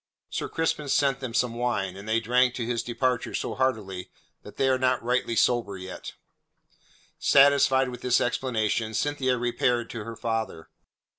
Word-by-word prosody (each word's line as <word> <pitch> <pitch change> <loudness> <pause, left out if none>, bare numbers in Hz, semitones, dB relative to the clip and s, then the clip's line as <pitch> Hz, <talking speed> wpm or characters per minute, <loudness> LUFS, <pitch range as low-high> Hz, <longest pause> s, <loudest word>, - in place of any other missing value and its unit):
"Sir - - -3
Crispin 155 -3 -1
sent 135 -1 +2
them 125 -4 -5
some 125 -2 +1
wine, 115 -6 -1
and 100 +3 -9
they 110 +1 +3
drank 125 +2 +2
to 120 - -3
his 120 0 -1
departure 120 +1 -1
so - - -2
heartily 110 -8 -2 0.3
that - - -13
they 135 - +2
are 130 -1 +2
not 130 -2 +1
rightly 125 -1 0
sober 115 -5 +1
yet." 95 0 -8 1.1
Satisfied 135 -2 +5
with 125 -1 -8
this 125 -1 +3
explanation 115 -3 -1
Cynthia 135 -2 0
repaired 120 0 0
to 115 -3 -5
her 115 +1 -7
father. 110 -9 -3
120 Hz, 160 wpm, -26 LUFS, 115-130 Hz, 1.1 s, Satisfied